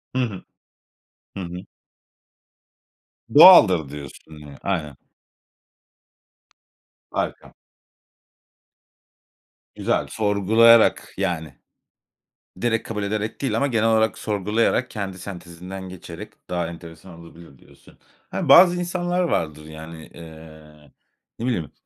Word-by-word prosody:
Hı 130 Hz, -, +1 dB
hı. 110 Hz, -7 st, -4 dB, 0.9 s
Hı -, -, -5 dB
hı. 90 Hz, +1 st, -8 dB, 1.7 s
Doğaldır 100 Hz, -, +8 dB
diyorsun 75 Hz, +2 st, -11 dB
ya, 70 Hz, -1 st, -13 dB
aynen. 75 Hz, -8 st, -3 dB, 2.1 s
Harika. -, -, -4 dB, 2.2 s
Güzel, -, -, -1 dB
sorgulayarak, 110 Hz, +2 st, +3 dB
yani, 80 Hz, -4 st, -3 dB, 1.1 s
direkt 115 Hz, -2 st, -1 dB
kabul 105 Hz, -2 st, -4 dB
ederek 105 Hz, +1 st, -4 dB
değil 135 Hz, -, -1 dB
ama 140 Hz, -, +1 dB
genel 115 Hz, -3 st, +1 dB
olarak 110 Hz, -1 st, +1 dB
sorgulayarak, 110 Hz, +4 st, -1 dB
kendi 95 Hz, -3 st, -6 dB
sentezinden 90 Hz, +1 st, -9 dB
geçerek 90 Hz, -1 st, -10 dB, 0.2 s
daha 85 Hz, -2 st, -2 dB
enteresan 85 Hz, +1 st, -12 dB
olabilir 85 Hz, -4 st, -15 dB
diyorsun. -, -, -21 dB, 0.3 s
Hani, -, -, -3 dB
bazı 175 Hz, 0 st, +8 dB
insanlar 175 Hz, 0 st, -2 dB
vardır 75 Hz, -, -2 dB
yani. 80 Hz, +1 st, -11 dB
Eee, 80 Hz, -2 st, -15 dB, 0.5 s
ne 115 Hz, -, -4 dB
bileyim? 100 Hz, -, -2 dB
95 Hz, 95 wpm, -22 LUFS, 80-110 Hz, 2.2 s, Doğaldır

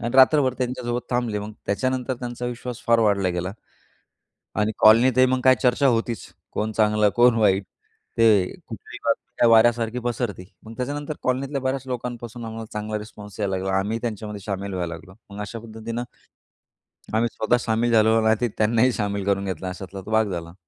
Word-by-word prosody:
आणि 120 Hz, -, -2 dB
रात्रभर 130 Hz, -1 st, +5 dB
त्यांच्यासोबत 125 Hz, -1 st, -2 dB
थांबले, 120 Hz, -4 st, 0 dB
मग 105 Hz, +1 st, -6 dB
त्याच्यानंतर 130 Hz, +4 st, -1 dB
त्यांचा 120 Hz, 0 st, -4 dB
विश्वास 125 Hz, 0 st, -6 dB
फार 115 Hz, 0 st, +5 dB
वाढला 100 Hz, -4 st, +2 dB
गेला. 90 Hz, +2 st, -3 dB, 1.1 s
आणि 105 Hz, +1 st, +2 dB
कॉलनीत 115 Hz, +4 st, +6 dB
मग 130 Hz, -, +1 dB
काय 130 Hz, 0 st, +6 dB
चर्चा 130 Hz, +2 st, +3 dB
होतीच, 115 Hz, -1 st, 0 dB, 0.2 s
कोण 110 Hz, +1 st, -2 dB
चांगलं, 105 Hz, -1 st, +3 dB
कोण 120 Hz, -1 st, +5 dB
वाईट, 100 Hz, -2 st, +3 dB, 0.5 s
ते 110 Hz, -5 st, +5 dB, 0.2 s
कुठली -, -, -9 dB
बातमी 120 Hz, -, +1 dB
वाऱ्यासारखी 115 Hz, +1 st, +4 dB
पसरते, 120 Hz, -5 st, -3 dB, 0.2 s
मग 110 Hz, +1 st, -10 dB
त्याच्यानंतर 145 Hz, +3 st, -3 dB
कॉलनीतल्या 135 Hz, +2 st, -1 dB
बऱ्याच 130 Hz, 0 st, -1 dB
लोकांपासून 120 Hz, -1 st, -5 dB
आम्हाला 115 Hz, 0 st, -6 dB
चांगला 105 Hz, 0 st, -3 dB
रिस्पॉन्स 105 Hz, -1 st, -11 dB
यायला 100 Hz, -2 st, 0 dB
लागला. 95 Hz, +1 st, -2 dB
आम्ही 110 Hz, +4 st, -2 dB
त्यांच्यामध्ये 105 Hz, -3 st, -4 dB
शामिल 100 Hz, -1 st, -4 dB
व्हायला 85 Hz, -2 st, -3 dB
लागलो. 85 Hz, +3 st, -11 dB, 0.2 s
मग 100 Hz, +1 st, -7 dB
अशा 115 Hz, +3 st, -6 dB
पद्धतीनं 115 Hz, +1 st, -6 dB, 1.1 s
आम्ही 115 Hz, +1 st, +2 dB
स्वतः 115 Hz, +3 st, +2 dB
सामील 120 Hz, 0 st, 0 dB
झालो 110 Hz, 0 st, +5 dB
नाही 110 Hz, 0 st, +4 dB
तर 120 Hz, -, +2 dB
त्यांनाही 115 Hz, +3 st, +3 dB
सामील 100 Hz, -3 st, -2 dB
करून 100 Hz, 0 st, +1 dB
घेतला 95 Hz, -1 st, -4 dB
अशातला 95 Hz, +1 st, -7 dB
भाग 110 Hz, -2 st, +2 dB
झाला. 85 Hz, -1 st, -5 dB
115 Hz, 165 wpm, -23 LUFS, 105-120 Hz, 1.1 s, कॉलनीत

